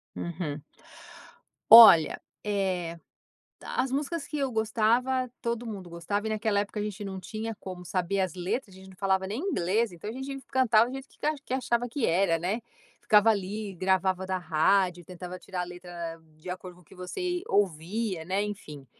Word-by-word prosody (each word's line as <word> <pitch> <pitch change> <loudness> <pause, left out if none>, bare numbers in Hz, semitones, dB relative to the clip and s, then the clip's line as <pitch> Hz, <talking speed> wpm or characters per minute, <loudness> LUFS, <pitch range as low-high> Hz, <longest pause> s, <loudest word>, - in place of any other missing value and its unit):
Uhum. 160 -4 -4 1.1
Olha, 220 -9 +10 0.2
eh, 185 -5 -1 0.6
as 260 - -2
músicas 290 +3 -2
que 300 - -4
eu 275 -2 -1
gostava, 235 +4 +1
todo 235 0 -2
mundo 200 -6 -7
gostava 200 +5 -3
e - - -2
naquela 215 -1 +1
época 205 +1 -5
a - - -1
gente 210 0 -5
não 190 -1 -5
tinha 220 +5 -5
como 185 -3 -8
saber 185 +2 -1
as 185 -4 -1
letras, 190 +4 -3
a - - -14
gente 190 0 -13
não 190 - -14
falava 190 -1 +1
nem 210 +5 -3
inglês. 230 - 0
Então, 175 +4 -7
a - - -5
gente 265 +2 -6
fi 265 - -21
cantava 235 -4 +4
do - - -7
jeito 270 0 -7 0.4
que - - -4
achava 240 -2 0
que 245 +1 -1
era, 170 0 +2
né, 195 +8 -2 0.4
ficava 210 +1 +5
ali, 205 0 -3
gravava 190 +1 +1
da 190 0 -1
rádio, 175 +2 +2
tentava 180 +1 -8
tirar 185 -1 -5
a - - -1
letra 175 -2 -7 0.2
de 155 +4 -10
acordo 180 0 -7
com 180 - -19
o - - -25
que - - -17
você 355 - -3
ouvia, 190 - 0
né, 190 +4 -1
enfim, 155 -9 -7
195 Hz, 185 wpm, -28 LUFS, 180-225 Hz, 1.1 s, Olha